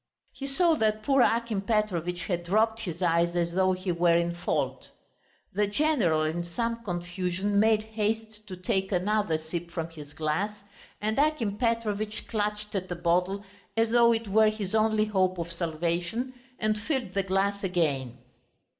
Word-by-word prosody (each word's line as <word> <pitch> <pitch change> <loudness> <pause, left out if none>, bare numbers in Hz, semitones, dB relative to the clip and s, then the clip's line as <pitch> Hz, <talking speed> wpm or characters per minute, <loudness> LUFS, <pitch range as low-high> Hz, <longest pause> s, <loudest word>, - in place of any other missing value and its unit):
He 275 - -5
saw 330 +5 +3
that 215 -2 +1
poor 270 +1 +4
Akim 230 -4 +2
Petrovitch 185 -5 0
had 175 -1 -2
dropped 220 +5 +2
his 180 -4 -4
eyes 170 0 +2
as 170 -1 +1
though 185 +1 +3
he 185 0 -2
were 170 0 +3
in 170 0 0
fault. 170 - -2 0.6
The 210 0 +2
general 205 - +2
in 160 +2 -1
some 230 +7 -3
confusion 180 +1 -1
made 215 0 +4
haste 220 0 -3
to 185 -2 -7
take 190 +2 -1
another 195 -2 +1
sip 165 +2 -5
from 165 -1 -4
his 150 -3 -11
glass, 160 +8 -1 0.4
and 215 +4 0
Akim 285 -9 +1
Petrovitch 215 -2 -1
clutched 210 -1 -2
at 185 -2 -2
the 175 - -2
bottle 180 +3 +1 0.3
as 225 0 +2
though 235 0 +6
it 225 -1 0
were 215 +2 +5
his 215 -3 -4
only 215 -1 +3
hope 185 -3 +1
of 170 0 -4
salvation 170 +8 -2 0.2
and 215 -1 0
filled 260 - -2
the 195 - +2
glass 195 +1 0
again. 145 -9 0
200 Hz, 165 wpm, -28 LUFS, 175-220 Hz, 0.6 s, though